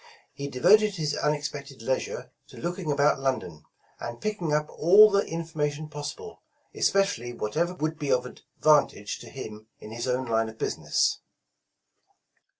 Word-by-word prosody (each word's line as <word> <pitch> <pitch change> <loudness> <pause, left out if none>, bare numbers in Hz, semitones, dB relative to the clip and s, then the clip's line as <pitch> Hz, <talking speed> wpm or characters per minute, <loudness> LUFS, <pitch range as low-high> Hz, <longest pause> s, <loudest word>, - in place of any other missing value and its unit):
He 140 - -5
devoted 200 +10 +4
his 155 -4 -1
unexpected 145 -4 -3
leisure 130 +2 -2 0.2
to - - -14
looking 175 -2 -3
about 145 0 +3
London, 110 - -3 0.3
and 120 0 -6
picking 205 -7 -2
up 150 0 +1
all 205 +6 +6
the 200 0 +4
informa 160 -4 -2
tion 155 +1 -8
possible, 155 - -7 0.3
especially 195 -12 +1
whatever 165 +12 -1
would 155 -1 -3
be 145 -3 -1
of 125 - +3
advantag'i 140 -5 +1
to - - -11
him 110 -5 -9
in 105 - -11
his 120 +2 -4
own 130 +1 0
line 115 -1 +1
of 110 - -12
business. - - 0
150 Hz, 150 wpm, -27 LUFS, 125-170 Hz, 0.3 s, all